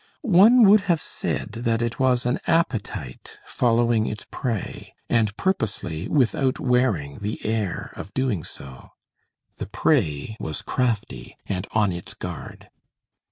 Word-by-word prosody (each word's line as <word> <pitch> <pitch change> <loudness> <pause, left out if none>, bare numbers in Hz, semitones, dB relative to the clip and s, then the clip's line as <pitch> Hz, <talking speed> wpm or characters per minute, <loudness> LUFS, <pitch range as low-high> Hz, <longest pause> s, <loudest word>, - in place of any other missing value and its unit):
One 225 +3 +7
would 205 0 +7
have 170 -2 +4
said - - -3
that 115 +1 -1
it 120 0 -3
was 130 -2 +2
an 125 +1 +1
appetite 165 - -1
following 115 -2 +2
its 105 - -5
prey, 115 -7 -4 0.2
and 110 -3 +2
purposely 100 - -2
without 130 -1 +1
wearing 125 - +1
the 105 +1 -4
air 110 -4 -2
of 100 - -8
doing 125 -11 0
so. 65 -2 -9 0.7
The - - -5
prey 110 - 0
was 80 - -4
crafty 120 -5 -2
and 95 0 -3
on 105 -3 +3
its 85 0 -6
guard. - - -8
115 Hz, 130 wpm, -24 LUFS, 100-130 Hz, 0.7 s, One